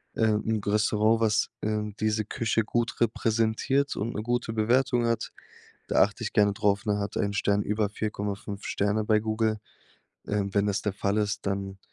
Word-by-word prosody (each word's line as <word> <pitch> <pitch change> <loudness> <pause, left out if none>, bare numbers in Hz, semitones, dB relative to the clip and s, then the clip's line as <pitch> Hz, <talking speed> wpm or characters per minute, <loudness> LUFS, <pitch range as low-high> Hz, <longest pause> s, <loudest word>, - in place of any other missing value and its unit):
äh, 115 - +2
'n 110 +1 +1
G 100 - -4
Restaurant, 105 +1 +2
was, 110 -1 +2
ähm, 105 -1 -2
diese 110 0 +1
Küche 115 +1 0
gut 120 +1 -1
repräsentiert 115 +4 +1
und 115 +3 -3
'ne 105 - -2
gute 120 0 -1
Bewertung 120 +2 +2
hat. 115 0 -1 0.6
Da - - +3
achte 105 +4 -3
ich - - -4
gerne 105 -1 +4
drauf, 100 0 +1
ne? 105 -1 +1
Hat 100 0 -4
er - - +1
ein 100 - -1
Stern 100 0 +1
über 105 0 0
4,5 105 -1 -4
Sterne 105 +2 0
bei 110 0 +4
Google. 110 0 0 0.7
Ähm, 100 -1 -1
wenn 100 0 +3
das 100 -1 0
der 105 - -1
Fall 100 +1 -1
ist, 105 -1 -1
dann 95 0 -3
105 Hz, 185 wpm, -27 LUFS, 100-110 Hz, 0.7 s, gerne